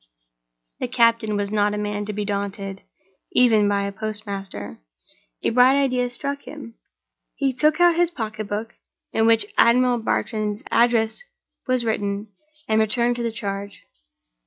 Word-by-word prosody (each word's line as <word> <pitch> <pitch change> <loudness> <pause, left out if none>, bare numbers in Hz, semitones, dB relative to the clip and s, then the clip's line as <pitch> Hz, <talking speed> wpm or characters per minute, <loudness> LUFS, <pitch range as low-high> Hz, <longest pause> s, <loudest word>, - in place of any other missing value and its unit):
The - - -2
captain 230 -3 +2
was 205 0 -2
not 210 -1 +1
a - - -3
man 205 0 -3
to 210 - -4
be 205 0 -3
daunted, 200 -1 -4 0.5
even 220 -5 +5
by 200 0 +1
a 200 - -2
postmaster. 200 - -6 0.7
A - - +2
bright 255 +3 +5
idea 250 -3 +1
struck 280 +3 -5
him. 275 -7 -9 0.6
He 275 -2 0
took 305 +5 +2
out 350 -1 +5
his 350 -1 +3
pocketbook, 215 -5 -5 0.4
in 225 0 +2
which 230 - +2
Admiral 245 +1 +4
Bartram's 215 -1 -2
address 230 - +2 0.5
was 255 -2 +1
written, 205 -1 -2 0.3
and 220 0 +2
returned 235 +2 +2
to - - -3
the 230 -1 -1
charge. 200 -2 -5
220 Hz, 145 wpm, -23 LUFS, 205-245 Hz, 0.7 s, even